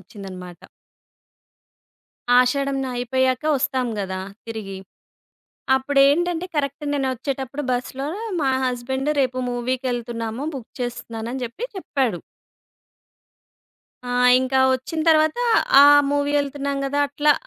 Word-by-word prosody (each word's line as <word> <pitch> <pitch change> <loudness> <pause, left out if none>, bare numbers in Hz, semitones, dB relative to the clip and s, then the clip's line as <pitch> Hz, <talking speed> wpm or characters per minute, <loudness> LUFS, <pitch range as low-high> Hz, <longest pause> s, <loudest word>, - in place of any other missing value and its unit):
వచ్చిందన్నమాట. 185 -2 -10 1.8
ఆషాఢం 275 +2 +2
న - - -3
అయిపోయాక 255 +2 0
ఒస్తాం 260 -2 0
గదా! 190 -1 -3 0.3
తిరిగి. 205 -4 -6 1.0
అప్పుడేంటంటే, 285 +6 +2
కరెక్ట్ 285 +1 -2
నేనొచ్చేటప్పుడు 270 0 -3
బస్‌లో 260 +2 -3 0.3
మా 270 -2 +2
హస్బెండు, 260 +3 -1
"రేపు 255 -1 -1
మూవీకెళ్తున్నాము. 245 -1 -3
బుక్ 250 -4 -9
చేస్తున్నాను" 235 -2 -5
అని 265 - -4
జెప్పి 285 - -6
చెప్పాడు. 265 - -1 1.9
ఆహ్, 250 0 +2 0.2
ఇంకా 260 +1 0
వచ్చిన 260 +5 -3
తర్వాత 310 -1 +4 0.5
ఆహ్, 290 0 +8
మూవీ 285 0 0
యెళ్తున్నాం 280 -1 -2
గదా! 285 +1 0
అట్లా 295 +1 +3
260 Hz, 100 wpm, -22 LUFS, 240-285 Hz, 1.9 s, ఆహ్